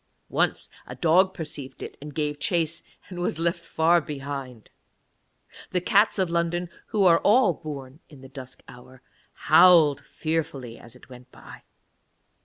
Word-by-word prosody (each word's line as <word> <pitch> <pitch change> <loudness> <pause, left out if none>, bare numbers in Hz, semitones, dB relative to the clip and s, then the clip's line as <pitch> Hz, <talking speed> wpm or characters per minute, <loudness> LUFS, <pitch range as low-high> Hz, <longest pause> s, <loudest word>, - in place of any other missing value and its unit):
Once - - 0 0.2
a - - -8
dog 180 +3 +3
perceived 145 -6 -8
it - - -8
and 150 0 -9
gave 150 -1 -2
chase, 165 +1 0 0.3
and 180 -2 -8
was 175 -2 -2
left 170 +1 -1
far 165 +1 +2
behind. 135 -5 -7 1.0
The 180 - 0
cats 205 +5 +2
of 185 -3 0
London, 170 +1 -1 0.2
who 205 -3 +1
are 170 -2 +6
all 210 -3 +4
born 145 -3 -9
in 145 -4 -15
the 135 - -11
dusk 130 -1 -11
hour, 125 +1 -15 0.4
howled 160 -3 +6
fearfully 140 -7 -4
as 120 +1 -12
it - - -17
went 125 0 -14
by. - - -14
155 Hz, 150 wpm, -25 LUFS, 135-175 Hz, 1.0 s, are